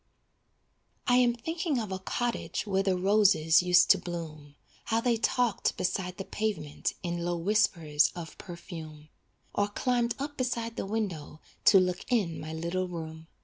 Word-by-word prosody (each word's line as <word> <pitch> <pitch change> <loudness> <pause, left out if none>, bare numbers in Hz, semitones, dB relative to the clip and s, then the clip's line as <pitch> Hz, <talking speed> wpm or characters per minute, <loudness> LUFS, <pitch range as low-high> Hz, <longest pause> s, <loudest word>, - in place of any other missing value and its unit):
I 245 -1 +4
am 245 -1 +4
thinking 325 +3 -2
of 215 -4 -3
a 190 - -3
cottage 240 +5 -2
Where 195 -2 +1
the 190 -2 +1
roses 190 -5 +4
used 180 0 +5
to - - +5
bloom, 155 -4 -7 0.3
How 225 - +1
they 235 0 +2
talked 235 -1 +1
beside 180 0 -2
the 195 - -5
pavement 205 -9 -3
In 170 -1 -2
low 175 0 -1
whispers 165 -5 +2
of 170 -2 -7
perfume, 160 -4 -9 0.4
Or 205 - +1
climbed 240 +3 0
up 290 +1 -5
beside 235 -3 -2
the 195 - -4
window 190 -9 -3 0.3
To 195 - +8
look 180 -1 0
in 195 -9 +1
my 155 - -6
little 170 +3 -2
room. 160 -2 -7
185 Hz, 155 wpm, -29 LUFS, 165-225 Hz, 0.4 s, To